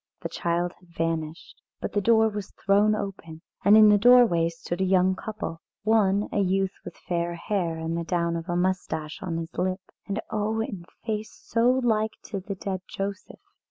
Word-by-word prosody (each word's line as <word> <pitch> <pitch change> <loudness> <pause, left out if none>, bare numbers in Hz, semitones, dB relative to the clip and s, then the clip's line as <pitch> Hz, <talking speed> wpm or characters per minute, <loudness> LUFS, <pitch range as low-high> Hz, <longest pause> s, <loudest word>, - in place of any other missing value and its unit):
The - - -4
child 175 +1 -1
had 180 - -23
vanished. 165 0 -3 0.2
But - - -4
the 205 - +1
door 225 +1 +5
was 210 -3 -5
thrown 205 +2 +4
open, 175 -6 -6 0.2
and 205 +2 +7
in 215 -1 +8
the 205 0 +5
doorway 220 -8 +6
stood 170 +2 -5
a - - +4
young 185 0 +3
couple 210 -6 -6 0.2
one 205 -2 +3
a - - 0
youth 195 0 +1
with 175 - -9
fair 170 -1 -1
hair 170 -2 -2
and 160 +1 -3
the 170 - -2
down 170 -1 0
of 165 +2 -5
a 175 - 0
moustache 175 -4 -1
on 170 -3 -3
his 165 0 -5
lip, 185 +1 -1 0.3
and 200 +1 -2
oh, 215 0 -1
in 205 -7 -4 0.2
face 215 -1 -4
so 230 +2 +3
like 220 -2 +1
to 200 - -5
the 195 +1 -6
dead 190 -1 -4
Joseph. 195 0 -5
190 Hz, 190 wpm, -26 LUFS, 170-210 Hz, 0.3 s, in